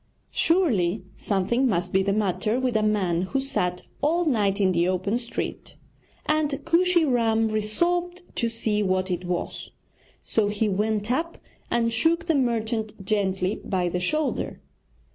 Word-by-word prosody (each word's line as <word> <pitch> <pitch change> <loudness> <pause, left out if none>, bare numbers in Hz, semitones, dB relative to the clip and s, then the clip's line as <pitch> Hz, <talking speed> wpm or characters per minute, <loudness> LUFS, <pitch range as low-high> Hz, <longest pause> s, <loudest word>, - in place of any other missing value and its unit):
Surely 220 - +2
something 230 +6 +1
must 180 -5 -1
be 190 - +4
the 195 +1 0
matter 210 +3 0
with 255 -3 -1
a 215 - +3
man 195 -5 +1
who 190 +9 -1
sat 180 -10 -1 0.2
all 335 +5 +2
night 210 -8 +1
in 190 -2 +3
the 170 0 +2
open 185 +5 0
street, 235 -1 -5 0.5
and 305 -1 +2 0.2
Kooshy 345 0 +3
Ram 225 -4 +2
resolved 345 - 0
to 235 - +1
see 220 -2 0
what 185 -1 0
it 180 0 -2
was; 175 0 -3 0.5
so 215 -2 0
he 210 +1 0
went 210 +2 0
up 335 +6 -1 0.3
and 230 -1 +1
shook 330 +8 +2
the 330 - +2
merchant 225 -6 -1
gently 195 -1 0
by 180 -3 0
the 180 - -2
shoulder. 300 +11 -1
215 Hz, 150 wpm, -25 LUFS, 190-265 Hz, 0.5 s, be